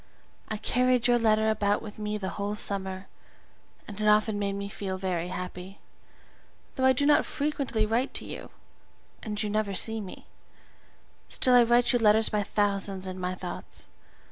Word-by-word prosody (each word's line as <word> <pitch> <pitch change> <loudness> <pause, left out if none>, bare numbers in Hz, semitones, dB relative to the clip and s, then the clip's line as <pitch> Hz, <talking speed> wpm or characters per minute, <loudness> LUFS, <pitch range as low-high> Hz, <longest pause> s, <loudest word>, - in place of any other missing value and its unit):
I 215 - -3
carried 250 +2 +1
your 240 0 +4
letter 220 -1 +3
about 205 -1 0
with 215 -1 -9
me 210 0 -2
the 190 -2 -4
whole 205 +1 -3
summer, 190 -2 -2 0.8
and 210 0 -7
it 215 - +1
often 210 0 +3
made 200 -1 -1
me 200 0 -4
feel 195 -2 -4
very 180 -2 -2
happy; 180 +1 -7 1.0
though 260 - 0
I 260 - +7
do 260 +2 +1
not 295 - +5
frequently 280 -7 -1
write 230 +5 -1
to - - 0
you, - - -8 0.7
and 210 -2 -5
you - - -1
never 205 -1 -1
see 220 +3 0
me, 190 - -10 1.0
still 255 - +3
I 245 - +8
write 240 +2 +4
you 245 - +3
letters 220 0 +4
by 210 -1 0
thousands 200 -2 -1
in 185 0 -4
my 180 0 -2
thoughts. 180 -1 -7
210 Hz, 170 wpm, -28 LUFS, 195-225 Hz, 1.0 s, I